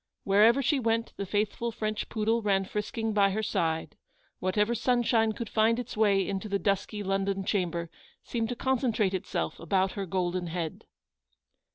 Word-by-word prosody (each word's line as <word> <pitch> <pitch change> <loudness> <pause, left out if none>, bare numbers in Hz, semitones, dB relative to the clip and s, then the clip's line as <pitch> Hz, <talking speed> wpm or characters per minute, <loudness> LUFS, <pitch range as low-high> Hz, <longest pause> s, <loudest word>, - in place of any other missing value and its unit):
Wher 200 +1 +5
ever 235 +5 +5
she 290 +2 +2
went 230 -1 0
the 200 - -4
faithful 215 +4 -1
French 215 -1 -3
poodle 225 +1 +1
ran 195 -2 +1
frisking 215 +2 -3
by 200 -1 +4
her 215 +3 -2
side; 165 -6 -1 0.4
whatever 210 +5 +1
sunshine 240 -2 +2
could 225 +2 -5
find 220 +2 +2
its 245 - -5
way 200 -3 +3
into 200 +2 -3
the 200 - +1
dusky 200 +1 -1
London 195 0 -1
chamber 170 -4 -1 0.4
seemed 225 -2 -2
to 245 - -2
concentrate 235 -6 +1
itself 85 - -3
about 190 +3 +1
her 195 -2 -4
golden 180 0 -1
head. 165 -1 -4
210 Hz, 165 wpm, -29 LUFS, 190-225 Hz, 0.4 s, Wher